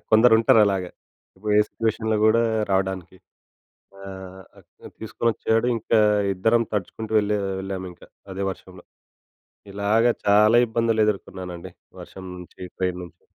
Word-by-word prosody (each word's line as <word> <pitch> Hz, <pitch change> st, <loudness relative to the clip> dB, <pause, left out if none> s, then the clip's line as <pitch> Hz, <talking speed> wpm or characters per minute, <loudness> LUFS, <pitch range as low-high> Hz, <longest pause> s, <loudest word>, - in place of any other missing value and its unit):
కొందరుంటారు 110 Hz, 0 st, +5 dB
అలాగ. 95 Hz, -2 st, -1 dB, 0.5 s
ఇప్పు‌డే 105 Hz, +2 st, +2 dB
సిట్యుయేషన్‌లో 110 Hz, -1 st, -1 dB
గూడా 115 Hz, +2 st, +4 dB, 0.3 s
రావడానికి. 95 Hz, -1 st, -2 dB, 0.8 s
ఆ! -, -, -13 dB, 1.0 s
తీసుకొచ్చాడు. 115 Hz, +1 st, -1 dB
ఇంకా 115 Hz, 0 st, +1 dB, 0.3 s
ఇద్దరం 115 Hz, +5 st, +2 dB
తడుచుకుంటూ 105 Hz, +2 st, -4 dB
వేళ్ళె 105 Hz, 0 st, +1 dB, 0.2 s
వెళ్ళాము 95 Hz, -1 st, -5 dB
ఇంక 85 Hz, -, -20 dB, 0.3 s
అదే 95 Hz, +1 st, -4 dB
వర్షంలో. 90 Hz, -1 st, -13 dB, 0.9 s
ఇలాగ 100 Hz, +3 st, +1 dB, 0.2 s
చాలా 105 Hz, +3 st, +5 dB
ఇబ్బందులు 115 Hz, -1 st, +1 dB
ఎదుర్కున్నానండి. 95 Hz, -3 st, -5 dB, 0.3 s
వర్షం 95 Hz, -, -11 dB
నుంచి 90 Hz, 0 st, -13 dB, 0.2 s
ట్రైన్ 90 Hz, -1 st, -2 dB
నుంచి. 85 Hz, 0 st, -17 dB
105 Hz, 110 wpm, -23 LUFS, 95-110 Hz, 1.0 s, కొందరుంటారు